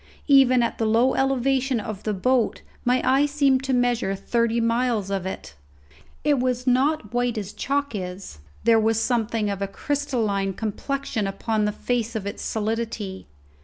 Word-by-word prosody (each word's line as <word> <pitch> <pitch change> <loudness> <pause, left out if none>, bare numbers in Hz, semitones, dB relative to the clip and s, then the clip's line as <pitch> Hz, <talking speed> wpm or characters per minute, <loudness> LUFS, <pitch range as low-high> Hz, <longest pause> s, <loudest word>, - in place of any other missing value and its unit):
Even 260 -4 +5
at 235 - -2
the 225 - +1
low 235 +4 +3
elevation 270 -1 +1
of 210 -2 -6
the 215 - -2
boat 250 +4 +1 0.2
my 250 +1 +2
eye 275 +3 +4
seemed 280 -2 +2
to 270 - -2
measure 245 -5 +1
thirty 235 +3 0
miles 230 -3 0
of 190 -2 -2
it. 190 - -7 0.7
It 290 -3 +3
was 250 0 -1
not 260 -2 +1
white 245 -1 0
as 205 -2 -5
chalk 280 0 -1
is; 180 - -6 0.2
there 230 0 +5
was 220 0 +2
something 225 -2 0
of 200 0 -5
a 200 - 0
crystalline 215 -5 -1
complexion 225 +1 -3
upon 210 +2 -1
the 210 - +1
face 235 +1 -2
of 210 -3 -3
its 200 - -5
solidity. 220 -3 -3
235 Hz, 165 wpm, -24 LUFS, 210-260 Hz, 0.7 s, Even